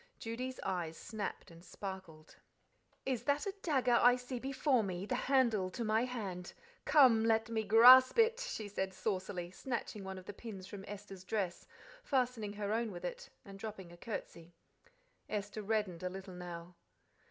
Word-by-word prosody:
Judy's 250 Hz, +3 st, -5 dB
eyes 170 Hz, -4 st, -2 dB
snapped 215 Hz, -5 st, -5 dB
and 165 Hz, +1 st, -14 dB
sparkled. 190 Hz, -6 st, -8 dB, 0.7 s
"'Is 255 Hz, -4 st, -1 dB
that 285 Hz, +4 st, +1 dB
a 395 Hz, -, -2 dB
dagger 265 Hz, -6 st, +1 dB
that 235 Hz, -, +4 dB
I 245 Hz, 0 st, +7 dB
see 250 Hz, 0 st, -5 dB
before 270 Hz, 0 st, +1 dB
me, 185 Hz, -1 st, -3 dB
the 230 Hz, -, -2 dB
handle 245 Hz, -7 st, +2 dB
to 235 Hz, +6 st, -4 dB
my 220 Hz, +2 st, +2 dB
hand? 195 Hz, -8 st, -5 dB, 0.3 s
Come, 255 Hz, -7 st, +6 dB
let 225 Hz, 0 st, +2 dB
me 220 Hz, -1 st, 0 dB
grasp 250 Hz, -, +8 dB
it,'" 460 Hz, +1 st, +4 dB
she -, -, -4 dB
said 190 Hz, -1 st, -3 dB
saucily, 185 Hz, -4 st, -3 dB
snatching 225 Hz, -1 st, -4 dB
one 190 Hz, 0 st, -6 dB
of 185 Hz, -, -10 dB
the 205 Hz, -, -7 dB
pins 200 Hz, -3 st, -8 dB
from 195 Hz, +1 st, -8 dB
Esther's 195 Hz, -2 st, -9 dB
dress, 190 Hz, -3 st, -3 dB, 0.4 s
fastening 250 Hz, -, 0 dB
her 205 Hz, 0 st, -2 dB
own 225 Hz, -1 st, 0 dB
with 175 Hz, -1 st, -7 dB
it, -, -, -6 dB, 0.2 s
and 195 Hz, 0 st, -11 dB
dropping 195 Hz, -5 st, -7 dB
a 175 Hz, -, -13 dB
curtsey. 170 Hz, -4 st, -7 dB, 0.7 s
Esther 210 Hz, 0 st, -3 dB
reddened 210 Hz, -5 st, -1 dB
a 180 Hz, -, -2 dB
little 190 Hz, 0 st, -8 dB
now. 175 Hz, -1 st, -8 dB
210 Hz, 170 wpm, -35 LUFS, 185-245 Hz, 0.7 s, grasp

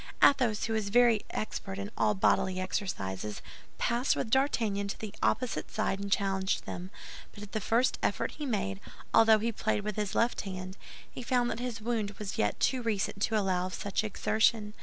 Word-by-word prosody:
Athos, 245 Hz, -7 st, +4 dB
who 225 Hz, -, -1 dB
was 215 Hz, -2 st, -1 dB
very 235 Hz, -1 st, +5 dB
expert 195 Hz, -2 st, -4 dB
in 200 Hz, +1 st, -5 dB
all 210 Hz, -, +2 dB
bodily 185 Hz, -1 st, +2 dB
exercises, 105 Hz, -, -3 dB, 0.4 s
passed 240 Hz, +3 st, +1 dB
with 220 Hz, -, -3 dB
D'Artagnan 225 Hz, -7 st, +1 dB
to 200 Hz, -, -4 dB
the 215 Hz, -2 st, -6 dB
opposite 255 Hz, -2 st, 0 dB
side 215 Hz, -2 st, -1 dB
and 200 Hz, 0 st, -5 dB
challenged 195 Hz, -1 st, +1 dB
them; 180 Hz, +1 st, -6 dB, 0.4 s
but 205 Hz, -, -9 dB
at 205 Hz, -, -10 dB
the 215 Hz, -, -2 dB
first 235 Hz, +6 st, +2 dB
effort -, -, 0 dB
he 300 Hz, -, -6 dB
made, 95 Hz, -, -1 dB, 0.3 s
although 225 Hz, -1 st, +7 dB
he 225 Hz, +2 st, -1 dB
played 220 Hz, -1 st, -1 dB
with 210 Hz, -1 st, -3 dB
his 210 Hz, -2 st, -2 dB
left 235 Hz, +1 st, +2 dB
hand, 185 Hz, -1 st, -6 dB, 0.3 s
he -, -, -9 dB
found 245 Hz, -1 st, +1 dB
that -, -, -4 dB
his 245 Hz, -2 st, -4 dB
wound 215 Hz, -3 st, -2 dB
was 205 Hz, -2 st, -5 dB
yet 105 Hz, -, +1 dB
too 260 Hz, -2 st, +2 dB
recent 205 Hz, -3 st, -1 dB
to 220 Hz, +1 st, +2 dB
allow 185 Hz, -3 st, +1 dB
of 185 Hz, -, -6 dB
such 200 Hz, +1 st, -1 dB
exertion. 215 Hz, 0 st, +1 dB
210 Hz, 190 wpm, -30 LUFS, 195-230 Hz, 0.4 s, although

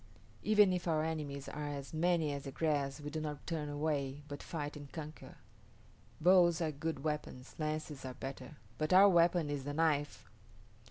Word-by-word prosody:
Even 210 Hz, -3 st, +5 dB
if 180 Hz, -1 st, -2 dB
our 155 Hz, -2 st, +2 dB
enemies 145 Hz, -4 st, -3 dB
are 150 Hz, 0 st, -4 dB
as 140 Hz, 0 st, -6 dB
many 160 Hz, -2 st, +2 dB
as 140 Hz, 0 st, -5 dB
the 135 Hz, -, -5 dB
grass 145 Hz, -2 st, 0 dB
we 150 Hz, 0 st, -6 dB
do 155 Hz, +1 st, -3 dB
not 150 Hz, -1 st, -5 dB
turn 155 Hz, -4 st, -3 dB
away, 145 Hz, -1 st, -2 dB
but 145 Hz, -1 st, -7 dB
fight 150 Hz, -3 st, -4 dB
and 145 Hz, -2 st, -10 dB
conquer. 155 Hz, -2 st, -8 dB, 0.8 s
Bows 175 Hz, 0 st, +5 dB
are 160 Hz, -2 st, 0 dB
good 150 Hz, -1 st, -4 dB
weapons, 150 Hz, -4 st, -4 dB
lances 155 Hz, -2 st, -3 dB
are 130 Hz, -1 st, -6 dB
better; 135 Hz, +1 st, -7 dB, 0.2 s
but 155 Hz, +3 st, +1 dB
our 195 Hz, +2 st, +9 dB
weapon 170 Hz, -4 st, +4 dB
is 145 Hz, -2 st, -3 dB
the 145 Hz, +1 st, -4 dB
knife." 145 Hz, -5 st, +1 dB
150 Hz, 175 wpm, -34 LUFS, 145-165 Hz, 0.8 s, our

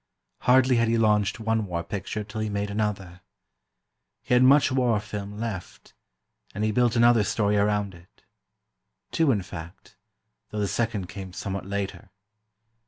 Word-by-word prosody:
Hardly 130 Hz, 0 st, +4 dB
had 115 Hz, 0 st, +2 dB
he 115 Hz, +1 st, +2 dB
launched 105 Hz, -2 st, +2 dB
one 110 Hz, -1 st, 0 dB
war 85 Hz, -2 st, -3 dB
picture 105 Hz, +3 st, -4 dB
till 110 Hz, +1 st, -6 dB
he 110 Hz, -, -2 dB
made 100 Hz, 0 st, -2 dB
another. 100 Hz, -4 st, -3 dB, 1.0 s
He -, -, -1 dB
had 125 Hz, -, +5 dB
much 135 Hz, +2 st, +5 dB
war 125 Hz, -4 st, +2 dB
film 105 Hz, 0 st, -7 dB
left, 110 Hz, -5 st, -6 dB, 0.6 s
and 105 Hz, -, -2 dB
he 110 Hz, -, +1 dB
built 120 Hz, +1 st, +2 dB
another 120 Hz, -2 st, +5 dB
story 105 Hz, 0 st, 0 dB
around 105 Hz, -1 st, +1 dB
it. 85 Hz, +1 st, -19 dB, 0.9 s
Two, 160 Hz, -4 st, +3 dB
in 100 Hz, -6 st, 0 dB
fact, 85 Hz, -2 st, -11 dB, 0.5 s
though 105 Hz, -, -7 dB
the 100 Hz, -, 0 dB
second 105 Hz, -2 st, -2 dB
came 95 Hz, -1 st, -8 dB
somewhat 95 Hz, -1 st, -5 dB
later. 100 Hz, +1 st, -4 dB
105 Hz, 155 wpm, -26 LUFS, 100-115 Hz, 1.0 s, had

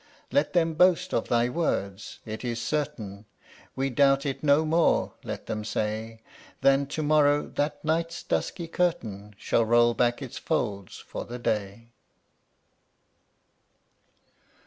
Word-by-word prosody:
Let 285 Hz, -, +1 dB
them 165 Hz, -2 st, +2 dB
boast 180 Hz, +2 st, +3 dB
of 115 Hz, -, 0 dB
thy 120 Hz, 0 st, +2 dB
word, 100 Hz, -, -1 dB, 0.2 s
"It 110 Hz, +2 st, -6 dB
is 120 Hz, -2 st, -2 dB
certain; 110 Hz, -7 st, -3 dB, 0.5 s
We 135 Hz, 0 st, -1 dB
doubt 135 Hz, +2 st, +3 dB
it 135 Hz, -2 st, -3 dB
no 145 Hz, +2 st, +4 dB
more," 165 Hz, +1 st, +2 dB
let -, -, -6 dB
them 105 Hz, -, -3 dB
say, 110 Hz, +1 st, -3 dB, 0.4 s
"Than 135 Hz, +1 st, +4 dB
to 155 Hz, +2 st, -3 dB
morrow 145 Hz, -1 st, +4 dB
that 145 Hz, +1 st, -2 dB
night's 165 Hz, +2 st, -1 dB
dusky 170 Hz, -3 st, -2 dB
curtain 110 Hz, -, -2 dB
Shall 115 Hz, -, +1 dB
roll 120 Hz, +1 st, +4 dB
back 120 Hz, 0 st, +1 dB
its 135 Hz, -4 st, -7 dB
folds 100 Hz, -5 st, -2 dB
for -, -, -7 dB
the 120 Hz, -, -6 dB
day." 110 Hz, 0 st, -3 dB
130 Hz, 130 wpm, -27 LUFS, 110-155 Hz, 0.5 s, no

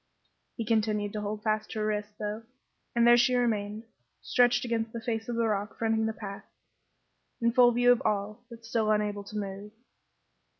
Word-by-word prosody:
He 230 Hz, -, -3 dB
continued 210 Hz, -2 st, 0 dB
to 210 Hz, -, -3 dB
hold 210 Hz, +1 st, -4 dB
fast 215 Hz, -1 st, 0 dB
to 220 Hz, -, -5 dB
her 215 Hz, -, 0 dB
wrists, 210 Hz, 0 st, -2 dB
though, 210 Hz, +1 st, -4 dB, 0.5 s
and 235 Hz, 0 st, +4 dB
there 240 Hz, 0 st, +7 dB
she 245 Hz, +1 st, +3 dB
remained, 215 Hz, -3 st, -1 dB, 0.4 s
stretched 245 Hz, 0 st, +3 dB
against 225 Hz, -1 st, -2 dB
the 235 Hz, -, -4 dB
face 225 Hz, 0 st, -3 dB
of 240 Hz, -, -2 dB
the 230 Hz, 0 st, +1 dB
rock 210 Hz, -1 st, -2 dB
fronting 225 Hz, -1 st, +1 dB
the -, -, 0 dB
path, 200 Hz, -2 st, -8 dB, 0.9 s
in 235 Hz, -1 st, +2 dB
full 245 Hz, 0 st, +6 dB
view 245 Hz, +1 st, +4 dB
of 245 Hz, -, +3 dB
all, 210 Hz, 0 st, -2 dB
but 230 Hz, -1 st, -12 dB
still 225 Hz, -1 st, 0 dB
unable 210 Hz, -1 st, 0 dB
to 210 Hz, +1 st, -8 dB
move. 200 Hz, 0 st, -5 dB
220 Hz, 185 wpm, -29 LUFS, 210-235 Hz, 0.9 s, there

